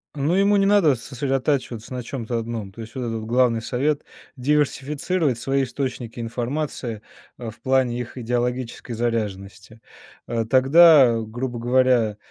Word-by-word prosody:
Ну, 150 +4 0
ему 200 +1 +3
не 195 - +3
надо 195 -9 +4
сосредотачиваться 130 -2 -2
на 125 - -3
чем-то 120 -1 -4
одном, 115 -4 -5
то 105 - -16
есть 115 +2 -10
вот 130 - -4
этот 115 -2 -3
вот 110 - -7
главный 120 -1 +2
совет- 140 +6 -1 0.3
диверсифицировать 145 +1 0
свои 135 +3 0
источники 125 -3 -5
информации, 120 -1 -4 0.4
а, 115 -2 -6
в 110 +1 -13
плане 130 -1 +1
их 120 +1 -7
идеологической 120 0 -3
заряженности. 110 -2 -4 0.5
А, 115 -1 -1
тогда, 135 -1 +6
грубо 120 +2 -5
говоря, 120 -3 +2
125 Hz, 140 wpm, -23 LUFS, 115-135 Hz, 0.5 s, тогда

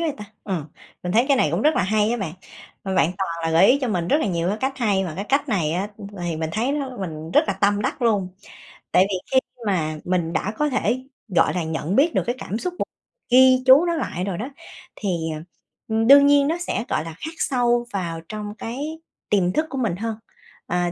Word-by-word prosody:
vậy 325 -3 0
ta, 210 - -8 0.2
ừm, 180 -7 -2 0.4
mình 180 - -3
thấy 230 +4 +4
cái 275 - +5
này 155 - +3
cũng 170 +7 -1
rất 305 +1 +4
là - - +2
hay 210 +3 +2
á 240 - 0
bạn, 195 -9 -4 0.5
mà 190 -1 -2
bạn 175 -1 +3
toàn 190 -2 -1
là 165 - 0
gợi 165 +4 +6
ý 270 +6 +5
cho 255 - -1
mình 175 -5 -1
rất 290 - +4
là - - 0
nhiều 170 -3 -1
cái 205 - 0
cách 265 0 -2
hay 200 -5 +1
mà 175 - -4
cái 200 - -3
cách 280 +2 +1
này 170 -9 0
á 185 +4 -1 0.3
thì 170 -2 -2
mình 160 0 -3
thấy 235 +6 0
nó 275 -3 -3
mình 160 -4 -6
rất - - +4
là 200 - +1
tâm 205 0 +2
đắc 250 - -2
luôn. 205 -6 +2 0.6
Tại 185 - +5
vì 195 - -1 0.2
khi 260 - +6 0.3
mà 155 -5 0
mình 175 -2 -1
đã 210 +4 -1
có 300 0 +1
thể, 255 -1 0 0.2
gọi 185 -5 +2
là, 180 - -1
nhận 160 +3 -2
biết 310 +5 +4
được - - +1
cái 240 - -1
cảm 210 - -4
xúc 360 +9 -3
và - - 0 0.4
ghi 255 0 +6
chú 265 +6 +7
nó 340 -1 0
lại 180 - -3
rồi 190 -2 -3
đó 240 +8 -4 0.5
thì, 205 - -3 0.3
ờ, - - -8 0.5
ưm, 225 0 +1
đương 280 +1 +9
nhiên 285 0 +5
nó 325 +3 0
sẽ, - - -1
gọi - - 0
là, 165 - -7
khắc 320 - -5
sâu 240 -4 +1
vào 170 -4 -3
trong 210 -1 -6
cái 285 +9 -5 0.3
tiềm 185 -4 +2
thức 310 - +1
của 270 - -5
mình 225 -9 0
hơn. 225 +3 -3 0.5
À, 175 0 0
210 Hz, 245 wpm, -23 LUFS, 180-260 Hz, 0.6 s, đương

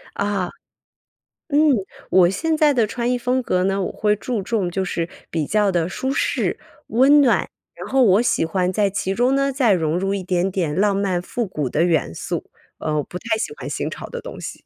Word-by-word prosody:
啊。 200 -3 -1 1.0
嗯， 290 -2 +2 0.5
我 180 -1 +5
现 320 - 0
在 305 -2 +4
的 235 -5 +2
穿 235 +3 -2
衣 250 - +1
风 250 +1 0
格 185 -6 0
呢， 195 +1 0
我 - - -2
会 210 -1 +1
注 225 +2 -3
重 195 -3 -1
就 190 +2 -1
是 170 -2 -2 0.2
比 160 -3 -1
较 210 +1 +2
地 170 -2 0
舒 260 +8 -2
适、 - - 0 0.3
温 275 +5 +5
暖， 250 -4 +2 0.3
然 - - -8
后 265 0 +3
我 205 +1 +5
喜 240 - +1
欢 180 +2 0
在 205 +1 +2
其 190 0 -2
中 245 +5 +2
呢， 275 0 +2
再 255 -5 +3
融 165 -2 +1
入 195 +1 -1
一 195 - -3
点 180 0 0
点 175 -6 -1
浪 200 0 +3
漫 190 -3 0
复 235 +7 -3
古 150 -7 -2
的 150 - 0
元 165 - +1
素， - - -4 0.3
呃， 155 - -2
我 - - +1
不 180 - -8
太 225 +3 -1
喜 220 - -3
欢 - - -7
新 - - -3
潮 - - -7
的 485 - -6
东 - - -9
西。 - - -7
200 Hz, 235 characters per minute, -21 LUFS, 180-245 Hz, 1.0 s, 我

